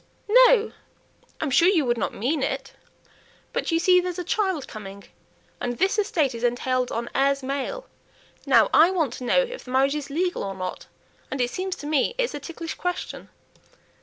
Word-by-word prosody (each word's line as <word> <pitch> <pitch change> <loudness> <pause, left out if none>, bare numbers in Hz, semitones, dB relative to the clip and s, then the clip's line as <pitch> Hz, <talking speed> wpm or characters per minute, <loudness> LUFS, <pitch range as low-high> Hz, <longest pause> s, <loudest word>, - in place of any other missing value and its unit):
"No! 450 -3 +3 0.7
I'm 300 - -2
sure 335 +7 +5
you 345 -7 +3
would 240 -1 0
not - - -1
mean 270 +8 -1
it; 270 0 -3 0.8
but, - - -2
you 330 - +2
see, 360 +2 +5
there's 360 0 -4
a 360 - -3
child 380 - -1
coming, 200 -2 -9 0.6
and 245 -1 -3
this 385 +4 +1
estate 315 - +1
is 230 0 -7
entailed 250 +1 0
on 235 +1 -3
'heirs 275 0 +1
male.' 280 - -3 0.6
Now, - - +5
I 330 - +7
want 325 -10 0
to - - -7
know 375 - +3
if - - -7
the - - -13
marriage 265 +2 +2
is 295 -2 -4
legal 355 +5 -1
or 195 -1 -4
not? 185 -1 -6 0.4
and 270 - -4
it 245 0 0
seems 370 0 -3
to - - -10
me 300 - +1
it's - - 0
a 290 - -4
ticklish 330 +3 -6
question." 360 0 -5
290 Hz, 190 wpm, -24 LUFS, 255-360 Hz, 0.8 s, I